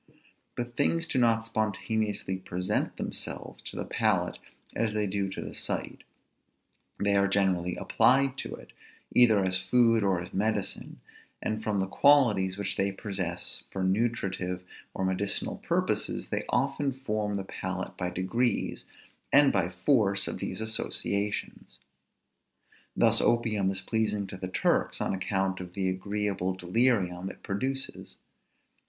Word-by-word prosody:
But 120 Hz, 0 st, -4 dB
things 165 Hz, +5 st, +2 dB
do 145 Hz, -, 0 dB
not 115 Hz, -2 st, +3 dB
spontaneously 110 Hz, -2 st, -1 dB
present 90 Hz, -1 st, -2 dB
themselves -, -, -5 dB
to -, -, -5 dB
the -, -, -3 dB
palate -, -, 0 dB, 0.4 s
as 110 Hz, -1 st, 0 dB
they 105 Hz, -1 st, +1 dB
do 100 Hz, 0 st, -1 dB
to 95 Hz, -, -6 dB
the -, -, -7 dB
sight; -, -, -3 dB, 1.0 s
they 100 Hz, 0 st, +1 dB
are 100 Hz, 0 st, +4 dB
generally 95 Hz, -3 st, +1 dB
applied 135 Hz, +1 st, +3 dB
to -, -, -4 dB
it, -, -, -15 dB, 0.4 s
either 110 Hz, -5 st, +6 dB
as 95 Hz, 0 st, +1 dB
food 115 Hz, +4 st, +3 dB
or 95 Hz, -3 st, +2 dB
as 90 Hz, +1 st, -8 dB
medicine; 105 Hz, 0 st, -2 dB, 0.4 s
and 110 Hz, 0 st, -2 dB
from 105 Hz, -2 st, 0 dB
the 95 Hz, -, +1 dB
qualities 105 Hz, -6 st, +4 dB
which 100 Hz, -, -2 dB
they 100 Hz, +1 st, +1 dB
possess 95 Hz, -4 st, -4 dB
for 95 Hz, -, -3 dB
nutritive 95 Hz, -3 st, -1 dB, 0.3 s
or 95 Hz, -, -1 dB
medicinal 95 Hz, +2 st, 0 dB
purposes -, -, -1 dB
they -, -, -2 dB
often 140 Hz, +2 st, +1 dB
form 110 Hz, -5 st, -2 dB
the 100 Hz, -, -2 dB
palate 95 Hz, 0 st, -4 dB
by 90 Hz, -1 st, -2 dB
degrees, 95 Hz, +8 st, -1 dB, 0.5 s
and 145 Hz, -1 st, +6 dB
by 95 Hz, -3 st, +2 dB
force 100 Hz, +1 st, +2 dB
of -, -, -4 dB
these -, -, -3 dB
associations. 100 Hz, -, -1 dB, 1.2 s
Thus -, -, +5 dB
opium 110 Hz, -5 st, +2 dB
is 95 Hz, -1 st, -1 dB
pleasing 105 Hz, 0 st, 0 dB
to 95 Hz, -1 st, -8 dB
Turks, 95 Hz, -, +1 dB
on -, -, -1 dB
account 95 Hz, 0 st, -1 dB
of 90 Hz, -1 st, -8 dB
the 95 Hz, -2 st, 0 dB
agreeable 95 Hz, -1 st, -2 dB
delirium 95 Hz, -2 st, +1 dB
it -, -, -12 dB
produces. 130 Hz, +7 st, -3 dB
100 Hz, 140 wpm, -29 LUFS, 95-115 Hz, 1.2 s, either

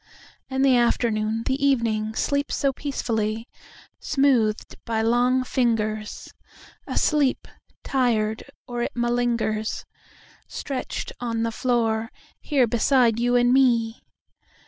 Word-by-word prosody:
……..And 265 Hz, 0 st, +1 dB
the 265 Hz, -2 st, +5 dB
afternoon, 225 Hz, -2 st, +1 dB
the 270 Hz, +2 st, -1 dB
evening, 225 Hz, -5 st, +1 dB
sleeps 285 Hz, +3 st, -1 dB
so 275 Hz, -1 st, +1 dB
peacefully! 225 Hz, -5 st, -2 dB, 0.5 s
Smoothed 255 Hz, -7 st, +1 dB
by 225 Hz, -1 st, -1 dB
long 245 Hz, +3 st, +2 dB
fingers, 215 Hz, -4 st, -2 dB, 0.5 s
Asleep… 290 Hz, -4 st, +1 dB, 0.4 s
tired… 225 Hz, -5 st, 0 dB, 0.2 s
or 240 Hz, -1 st, -4 dB
it -, -, -3 dB
malingers, 240 Hz, -2 st, -1 dB, 0.6 s
Stretched 270 Hz, -3 st, -5 dB
on 230 Hz, -2 st, -2 dB
the 230 Hz, -, -1 dB
floor, 225 Hz, -2 st, 0 dB, 0.3 s
here 275 Hz, -5 st, +2 dB
beside 235 Hz, 0 st, +2 dB
you 245 Hz, +1 st, +2 dB
and 245 Hz, 0 st, +4 dB
me. 235 Hz, -4 st, +2 dB
240 Hz, 105 wpm, -24 LUFS, 225-260 Hz, 0.6 s, the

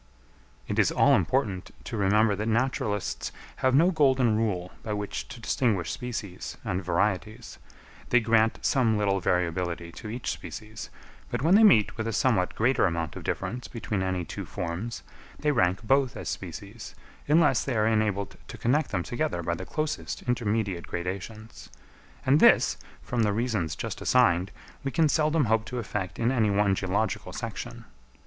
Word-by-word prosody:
It -, -, -1 dB
is -, -, +4 dB
all -, -, +4 dB
important 95 Hz, -1 st, 0 dB
to 120 Hz, -, -5 dB
remember 105 Hz, +1 st, +3 dB
that 105 Hz, +2 st, -3 dB
naturalists 110 Hz, -4 st, -1 dB, 0.3 s
have 130 Hz, 0 st, +2 dB
no 170 Hz, +6 st, +5 dB
golden 130 Hz, -8 st, +3 dB
rule 95 Hz, -5 st, -1 dB
by 110 Hz, -, -4 dB
which 105 Hz, -1 st, -4 dB
to 125 Hz, -, -10 dB
distinguish 110 Hz, -6 st, 0 dB
species 115 Hz, -7 st, -5 dB
and 95 Hz, -4 st, -2 dB
varieties; 95 Hz, +4 st, -1 dB, 0.5 s
they 125 Hz, -, +5 dB
grant 115 Hz, -1 st, +3 dB
some 115 Hz, -5 st, +2 dB
little 100 Hz, -2 st, +1 dB
variability 85 Hz, -1 st, -1 dB
to 110 Hz, -, -9 dB
each 120 Hz, +3 st, -3 dB
species, 110 Hz, 0 st, -8 dB, 0.4 s
but -, -, -3 dB
when 165 Hz, +4 st, +4 dB
they 210 Hz, -, +7 dB
meet 145 Hz, -, +5 dB
with 110 Hz, 0 st, -2 dB
a 115 Hz, -, -2 dB
somewhat 105 Hz, -5 st, +1 dB
greater 120 Hz, -1 st, +3 dB
amount 85 Hz, -2 st, -3 dB
of -, -, -7 dB
difference 120 Hz, +7 st, -3 dB
between 110 Hz, -4 st, -3 dB
any 95 Hz, -2 st, -1 dB
two -, -, -6 dB
forms, 90 Hz, +7 st, -5 dB, 0.3 s
they 150 Hz, -, +1 dB
rank 95 Hz, -6 st, +1 dB
both 135 Hz, +2 st, +2 dB
as -, -, -5 dB
species, -, -, -7 dB, 0.3 s
unless 150 Hz, +1 st, +4 dB
they 130 Hz, -, -2 dB
are 105 Hz, -, +3 dB
enabled 110 Hz, -3 st, 0 dB
to -, -, -9 dB
connect 145 Hz, +7 st, +1 dB
them 90 Hz, -3 st, -1 dB
together 120 Hz, -, -2 dB
by 85 Hz, -, -1 dB
the 95 Hz, +2 st, -6 dB
closest 155 Hz, 0 st, -3 dB
intermediate 110 Hz, -7 st, -1 dB
gradations; 100 Hz, +5 st, -6 dB, 0.6 s
and 140 Hz, +3 st, +5 dB
this, -, -, +5 dB, 0.3 s
from 120 Hz, -1 st, -1 dB
the 105 Hz, -2 st, +2 dB
reasons 105 Hz, -, -1 dB
just -, -, -5 dB
assigned, 95 Hz, -8 st, +3 dB, 0.3 s
we 135 Hz, -, -1 dB
can 160 Hz, +3 st, +3 dB
seldom 155 Hz, 0 st, +2 dB
hope 110 Hz, 0 st, +2 dB
to 110 Hz, +3 st, -6 dB
effect 100 Hz, -7 st, -4 dB
in 115 Hz, +2 st, +1 dB
any 115 Hz, -5 st, +2 dB
one 100 Hz, 0 st, +3 dB
geological 100 Hz, +3 st, -1 dB
section. -, -, -6 dB
110 Hz, 165 wpm, -27 LUFS, 95-125 Hz, 0.6 s, they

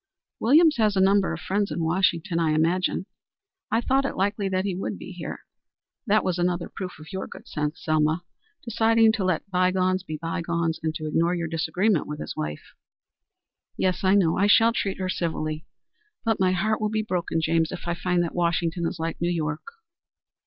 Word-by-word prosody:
"Williams 305 Hz, +6 st, +5 dB
has 215 Hz, -3 st, +2 dB
a -, -, +2 dB
number 195 Hz, 0 st, +4 dB
of 165 Hz, -, -4 dB
friends 200 Hz, +1 st, 0 dB
in 170 Hz, -, -2 dB
Washington, 170 Hz, +1 st, +1 dB
I 160 Hz, -2 st, +2 dB
imagine. 175 Hz, +4 st, +1 dB, 0.6 s
I 225 Hz, +2 st, +2 dB
thought 270 Hz, +3 st, +2 dB
it 275 Hz, -, -3 dB
likely 200 Hz, +1 st, 0 dB
that 185 Hz, 0 st, 0 dB
he 195 Hz, -, -1 dB
would 185 Hz, -, -4 dB
be -, -, -9 dB
here. -, -, -7 dB, 0.6 s
That 215 Hz, +1 st, +3 dB
was 180 Hz, -1 st, -1 dB
another 175 Hz, 0 st, 0 dB
proof 185 Hz, -2 st, -6 dB
of 155 Hz, +2 st, -12 dB
your 190 Hz, -, -4 dB
good -, -, -12 dB
sense, 150 Hz, 0 st, -3 dB
Selma 155 Hz, +2 st, +1 dB, 0.4 s
deciding 225 Hz, -1 st, +4 dB
to 220 Hz, -3 st, -2 dB
let 185 Hz, -2 st, 0 dB
bygones 185 Hz, 0 st, +2 dB
be 155 Hz, -, -6 dB
bygones 165 Hz, 0 st, -2 dB
and 160 Hz, 0 st, -2 dB
to 155 Hz, -, -5 dB
ignore 165 Hz, +3 st, +1 dB
your 170 Hz, -2 st, -2 dB
disagreement 165 Hz, +4 st, 0 dB
with 150 Hz, 0 st, -5 dB
his -, -, -5 dB
wife." 75 Hz, 0 st, -5 dB, 1.0 s
"Yes, 185 Hz, 0 st, 0 dB
I 190 Hz, +1 st, +4 dB
know. 170 Hz, -5 st, +3 dB
I 200 Hz, -, +3 dB
shall 225 Hz, +2 st, +5 dB
treat 195 Hz, -4 st, -1 dB
her 185 Hz, -, -2 dB
civilly. 160 Hz, -3 st, -3 dB, 0.6 s
But 225 Hz, -2 st, +1 dB
my 185 Hz, -1 st, +3 dB
heart 215 Hz, +5 st, 0 dB
will 215 Hz, -, +1 dB
be 215 Hz, 0 st, -1 dB
broken, 180 Hz, -5 st, -1 dB
James, 160 Hz, 0 st, +1 dB
if -, -, -6 dB
I 170 Hz, -, +1 dB
find 175 Hz, 0 st, 0 dB
that 170 Hz, -, -4 dB
Washington 170 Hz, 0 st, 0 dB
is 165 Hz, -, -4 dB
like 165 Hz, 0 st, -4 dB
New 170 Hz, -, +1 dB
York." 155 Hz, -3 st, -3 dB
180 Hz, 195 wpm, -25 LUFS, 165-200 Hz, 1.0 s, Williams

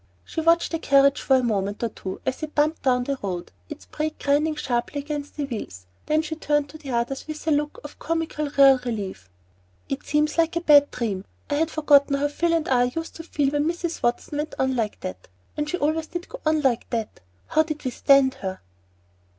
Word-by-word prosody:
She 320 Hz, -, -3 dB
watched 335 Hz, +1 st, +3 dB
the 330 Hz, -, -1 dB
carriage 275 Hz, -2 st, +4 dB
for 265 Hz, -, +3 dB
a 260 Hz, -, +3 dB
moment 205 Hz, -2 st, -1 dB
or 230 Hz, -, +1 dB
two 190 Hz, -2 st, -7 dB
as 260 Hz, -, -2 dB
it 310 Hz, -1 st, -6 dB
bumped 305 Hz, +2 st, +2 dB
down 250 Hz, -2 st, +2 dB
the 275 Hz, +1 st, -3 dB
road, 180 Hz, -3 st, -4 dB, 0.2 s
its -, -, -9 dB
brake 305 Hz, 0 st, -3 dB
grinding 300 Hz, +2 st, +1 dB
sharply 260 Hz, -1 st, -2 dB
against 290 Hz, 0 st, -5 dB
the 295 Hz, -, -1 dB
wheels, 150 Hz, -, -7 dB, 0.2 s
then 310 Hz, +1 st, +2 dB
she 315 Hz, 0 st, -4 dB
turned 295 Hz, -2 st, 0 dB
to 315 Hz, +2 st, -11 dB
the 290 Hz, -3 st, -9 dB
others 245 Hz, +3 st, -2 dB
with 310 Hz, 0 st, -7 dB
a -, -, +3 dB
look 295 Hz, 0 st, 0 dB
of 295 Hz, -, -10 dB
comically 325 Hz, -2 st, -2 dB
real 270 Hz, -1 st, +7 dB
relief. 200 Hz, -, -5 dB, 0.6 s
"It 275 Hz, -, -2 dB
seems 300 Hz, +2 st, +1 dB
like 330 Hz, +1 st, +2 dB
a 340 Hz, -, 0 dB
bad 290 Hz, -3 st, +6 dB
dream! 205 Hz, -6 st, -3 dB, 0.3 s
I -, -, +2 dB
had 315 Hz, +2 st, +1 dB
forgotten 290 Hz, -3 st, +4 dB
how 285 Hz, +1 st, 0 dB
Phil 335 Hz, +3 st, 0 dB
and 330 Hz, -1 st, +1 dB
I 245 Hz, -2 st, +3 dB
used 325 Hz, +7 st, -5 dB
to 330 Hz, -, -7 dB
feel 290 Hz, -4 st, 0 dB
when 290 Hz, 0 st, +1 dB
Mrs. 345 Hz, 0 st, -3 dB
Watson 240 Hz, +5 st, -1 dB
went 305 Hz, +1 st, -3 dB
on 265 Hz, 0 st, +1 dB
like 220 Hz, -4 st, -2 dB
that, 90 Hz, 0 st, -7 dB, 0.3 s
and 300 Hz, 0 st, -2 dB
she 360 Hz, -, -1 dB
always 315 Hz, +1 st, 0 dB
did 350 Hz, +2 st, -6 dB
go -, -, -9 dB
on 310 Hz, 0 st, +3 dB
like 255 Hz, -4 st, +1 dB
that. 225 Hz, -3 st, -3 dB, 0.3 s
How 315 Hz, -, +4 dB
did 305 Hz, -2 st, -4 dB
we 255 Hz, -, 0 dB
stand 275 Hz, +1 st, +4 dB
her?" 190 Hz, -1 st, -4 dB
290 Hz, 220 wpm, -24 LUFS, 250-310 Hz, 0.6 s, real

